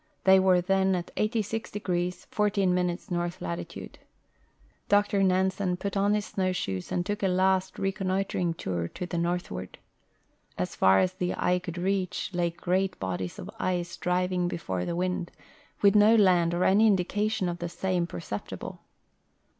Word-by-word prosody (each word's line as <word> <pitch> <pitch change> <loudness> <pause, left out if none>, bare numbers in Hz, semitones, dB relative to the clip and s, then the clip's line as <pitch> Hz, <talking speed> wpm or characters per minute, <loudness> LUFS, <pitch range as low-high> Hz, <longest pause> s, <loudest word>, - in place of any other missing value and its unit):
They 190 0 +7
were 185 -1 +4
then 190 +1 +2
at 175 -1 -5
86° 205 -5 -2
14' 185 -4 +1
north 175 0 -2
latitude. 85 0 -6 0.9
Dr 205 -1 +3
Xansen 190 0 +1
put 200 +2 -4
on 200 +1 +3
his 210 -1 -1
snowshoes 180 - -2
and 175 - 0
took 205 +1 -3
a 195 - +2
last 190 0 +1
reconnoitering 190 -3 -1
tour 90 - -3
to 180 - -6
the 175 -1 -3
northward. 170 - -3 0.8
As 90 - -3
far 95 0 +5
as 185 - +2
the 180 -1 -2
eye 180 0 +2
could 175 -1 -7
reach 190 +1 -1
lay 175 -1 +1
great 185 +2 -1
bodies 95 -1 -3
of 195 - -7
ice 175 -4 -1
driving 180 0 0
before 95 - -3
the 170 - -2
wind, 180 -1 -1 0.5
with 200 -1 +6
no 210 +2 +6
land 180 -5 +4
or 175 - +1
any 210 +4 +5
indication 205 +1 +1
of 175 0 -3
the 175 - -3
same 180 -1 -1
perceptible. 105 -13 -6
180 Hz, 150 wpm, -28 LUFS, 175-195 Hz, 0.9 s, They